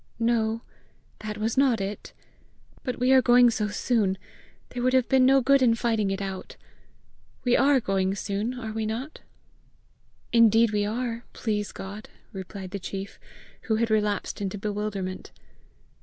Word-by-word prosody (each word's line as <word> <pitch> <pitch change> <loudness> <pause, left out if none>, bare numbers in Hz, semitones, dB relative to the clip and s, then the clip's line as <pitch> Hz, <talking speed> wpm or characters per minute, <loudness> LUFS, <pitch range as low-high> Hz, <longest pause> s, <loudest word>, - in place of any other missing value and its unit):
"No, 230 0 0 0.6
that 215 0 -5
was 220 +3 -2
not 260 -5 +3
it. 195 +1 -5 0.7
But 250 - -3
we 250 +1 +2
are 265 -1 +7
going 245 -1 +6
so 210 -2 -1
soon, 205 -2 0 0.5
there 245 - -5
would 255 +1 +2
have 260 -2 +3
been 260 -1 +4
no 270 0 +5
good 275 +2 +4
in 235 -3 +4
fighting 225 -3 0
it 195 +1 -2
out. 190 -1 -6 0.9
We 245 -1 +3
ARE 275 0 +4
going 195 -3 0
soon, 210 +5 -3
are 220 -2 -5
we 220 0 -2
not?" 245 +8 -5 1.1
"Indeed 230 -1 +5
we 205 -1 +1
are, 235 +1 -3
please 210 -3 -2
God!" 205 +3 -8 0.2
replied 190 -1 -7
the 200 - -4
chief, 195 +1 -6 0.5
who 220 - +3
had 225 0 0
relapsed 210 -2 0
into 195 0 -3
bewilderment. 205 -2 -4
220 Hz, 155 wpm, -26 LUFS, 205-245 Hz, 1.1 s, are